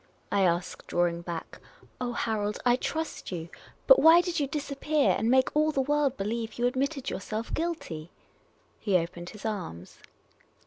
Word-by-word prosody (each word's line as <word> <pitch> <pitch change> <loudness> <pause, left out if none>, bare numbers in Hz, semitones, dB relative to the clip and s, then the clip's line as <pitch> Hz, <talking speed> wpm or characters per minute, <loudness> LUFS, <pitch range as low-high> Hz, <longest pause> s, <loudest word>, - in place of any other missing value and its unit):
I 200 - +2
asked, 175 -1 0
drawing 175 -1 +1
back. 170 -1 -6 0.2
" - - -24
Oh, 245 -1 -1
Harold, 210 -3 -1
I 245 0 +5
trust 320 +1 -4
you; 170 -2 -5 0.4
but - - +8
why 325 +2 +8
did 350 -2 -2
you 285 - 0
disappear 290 0 +1
and 225 - 0
make 260 +2 +3
all 305 +1 +3
the 275 - -1
world 285 0 +1
believe 225 +3 -3
you 240 - 0
admitted 275 +2 -1
yourself 220 +1 -4
guilty?" 310 - -3 0.7
He 200 -4 +2
opened 175 +1 -4
his 210 0 -11
arms. 180 - -5
240 Hz, 165 wpm, -28 LUFS, 185-290 Hz, 0.7 s, but